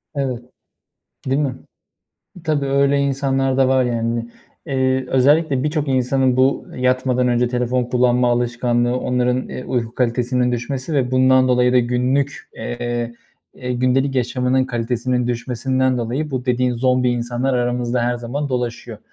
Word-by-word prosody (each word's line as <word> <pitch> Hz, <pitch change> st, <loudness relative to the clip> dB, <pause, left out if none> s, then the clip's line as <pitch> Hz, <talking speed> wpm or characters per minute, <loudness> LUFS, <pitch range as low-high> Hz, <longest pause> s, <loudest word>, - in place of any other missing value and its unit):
Evet. 130 Hz, -4 st, -2 dB, 0.9 s
Değil 135 Hz, +3 st, +1 dB
mi? 135 Hz, -4 st, -1 dB, 0.9 s
Tabii 150 Hz, -4 st, 0 dB
öyle 140 Hz, +1 st, +2 dB
insanlar 135 Hz, -1 st, 0 dB
da 135 Hz, -1 st, +4 dB
var 130 Hz, 0 st, +3 dB
yani. 115 Hz, -1 st, -2 dB, 0.4 s
Eee, 130 Hz, -2 st, 0 dB
özellikle 140 Hz, +1 st, +3 dB
birçok 150 Hz, -1 st, -1 dB
insanın 130 Hz, 0 st, +1 dB
bu 130 Hz, +2 st, +2 dB
yatmadan 125 Hz, 0 st, +1 dB
önce 120 Hz, 0 st, +2 dB
telefon 125 Hz, 0 st, 0 dB
kullanma 125 Hz, 0 st, +2 dB
alışkanlığı, 120 Hz, 0 st, 0 dB
onların, 125 Hz, 0 st, 0 dB
eee, 130 Hz, -, -6 dB
uyku 120 Hz, -2 st, -2 dB
kalitesinin 125 Hz, 0 st, 0 dB
düşmesi 130 Hz, +5 st, -3 dB
ve 130 Hz, -3 st, 0 dB
bundan 130 Hz, 0 st, +4 dB
dolayı 125 Hz, 0 st, +3 dB
da 125 Hz, -, +6 dB
günlük, 125 Hz, +4 st, -1 dB
eee, 120 Hz, 0 st, -4 dB, 0.4 s
gündelik 130 Hz, +2 st, 0 dB
yaşamının 125 Hz, +1 st, +1 dB
kalitesinin 125 Hz, +1 st, -1 dB
düşmesinden 130 Hz, +2 st, 0 dB
dolayı 130 Hz, +6 st, -3 dB
bu 130 Hz, -1 st, -3 dB
dediğin 125 Hz, 0 st, +1 dB
zombi 125 Hz, +1 st, +2 dB
insanlar 120 Hz, +2 st, -1 dB
aramızda 120 Hz, 0 st, 0 dB
her 120 Hz, +1 st, 0 dB
zaman 135 Hz, +5 st, -4 dB
dolaşıyor. 120 Hz, -2 st, -4 dB
125 Hz, 135 wpm, -20 LUFS, 120-130 Hz, 0.9 s, da